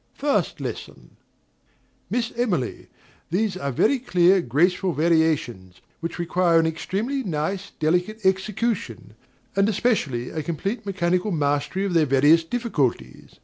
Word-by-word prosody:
First 285 Hz, 0 st, 0 dB
Lesson. -, -, -7 dB, 0.9 s
Miss 235 Hz, -1 st, -1 dB
Emily, 190 Hz, -, -2 dB, 0.4 s
these 195 Hz, +3 st, 0 dB
are 140 Hz, -7 st, -3 dB
very 255 Hz, -, +2 dB
clear, 185 Hz, -5 st, +3 dB
graceful 175 Hz, +7 st, +1 dB
variations, 150 Hz, -, 0 dB, 0.2 s
which 165 Hz, 0 st, -5 dB
require 175 Hz, -1 st, +2 dB
an 165 Hz, -, +2 dB
extremely 200 Hz, -, -2 dB
nice, 190 Hz, -, -3 dB
delicate 180 Hz, +7 st, 0 dB
execution; 190 Hz, -, -1 dB, 0.4 s
and, 195 Hz, +2 st, +3 dB
especially, 160 Hz, -, 0 dB
a 155 Hz, -, -3 dB
complete 195 Hz, -, -4 dB
mechanical 185 Hz, 0 st, 0 dB
mastery 145 Hz, +3 st, 0 dB
of 195 Hz, -, -2 dB
their 160 Hz, -3 st, +3 dB
various 145 Hz, +5 st, +5 dB
difficulties. 150 Hz, -, -2 dB
175 Hz, 120 wpm, -23 LUFS, 150-200 Hz, 0.9 s, various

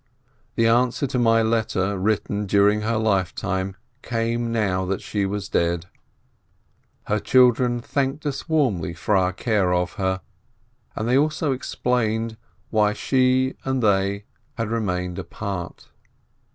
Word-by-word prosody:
The 115 Hz, -, +2 dB
answer 125 Hz, +3 st, +2 dB
to 125 Hz, -1 st, -1 dB
my 115 Hz, -1 st, +4 dB
letter 110 Hz, -3 st, 0 dB
written 100 Hz, +1 st, -1 dB
during 100 Hz, +2 st, +3 dB
her 110 Hz, +1 st, 0 dB
lifetime 95 Hz, -2 st, -1 dB, 0.3 s
came 115 Hz, 0 st, -1 dB
now 100 Hz, -5 st, 0 dB
that 95 Hz, +1 st, -3 dB
she 100 Hz, -2 st, -1 dB
was 100 Hz, 0 st, -3 dB
dead. 85 Hz, -2 st, 0 dB, 1.2 s
Her 105 Hz, -, 0 dB
children 125 Hz, 0 st, +3 dB
thanked 140 Hz, +4 st, -2 dB
us 140 Hz, +3 st, -4 dB
warmly 105 Hz, -, +1 dB
for 95 Hz, +5 st, 0 dB
our 95 Hz, -1 st, +3 dB
care 100 Hz, -2 st, 0 dB
of 90 Hz, 0 st, 0 dB
her, 95 Hz, 0 st, 0 dB, 0.7 s
and 110 Hz, -, -2 dB
they 125 Hz, +3 st, +4 dB
also 150 Hz, 0 st, 0 dB
explained 115 Hz, -3 st, -1 dB, 0.4 s
why 105 Hz, -1 st, +3 dB
she 130 Hz, +2 st, +2 dB
and 130 Hz, -2 st, -1 dB
they 100 Hz, 0 st, +1 dB, 0.3 s
had 115 Hz, -2 st, -2 dB
remained 90 Hz, -6 st, -2 dB
apart. 100 Hz, -5 st, -6 dB
110 Hz, 130 wpm, -23 LUFS, 95-120 Hz, 1.2 s, my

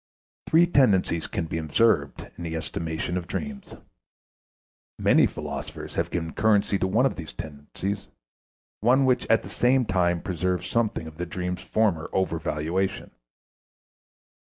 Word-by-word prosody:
Three 165 Hz, +2 st, +6 dB
tendencies 100 Hz, -, +3 dB
can 85 Hz, -, -2 dB
be 80 Hz, 0 st, -3 dB
observed 80 Hz, -1 st, +1 dB
in 85 Hz, -, -8 dB
the 80 Hz, -1 st, -3 dB
estimation 80 Hz, +2 st, -3 dB
of 85 Hz, -1 st, -4 dB
dreams. 205 Hz, -, -5 dB, 1.2 s
Many -, -, +5 dB
philosophers -, -, -6 dB
have -, -, -1 dB
given 80 Hz, -2 st, -3 dB
currency 105 Hz, -2 st, +2 dB
to 95 Hz, -, +1 dB
one 110 Hz, +7 st, +3 dB
of 135 Hz, -, 0 dB
these 80 Hz, -2 st, -7 dB
tendencies, 85 Hz, +6 st, -5 dB, 0.7 s
one 130 Hz, +5 st, +4 dB
which 125 Hz, -1 st, +2 dB
at 115 Hz, -, +3 dB
the -, -, -8 dB
same 125 Hz, +1 st, +2 dB
time 90 Hz, -3 st, +1 dB
preserves 90 Hz, 0 st, -1 dB
something 115 Hz, -7 st, 0 dB
of 80 Hz, -1 st, -10 dB
the 90 Hz, +1 st, -3 dB
dream's 90 Hz, +1 st, -3 dB
former 100 Hz, -8 st, 0 dB
over 95 Hz, -3 st, 0 dB
valuation. 85 Hz, +5 st, -2 dB
90 Hz, 140 wpm, -26 LUFS, 80-110 Hz, 1.2 s, Three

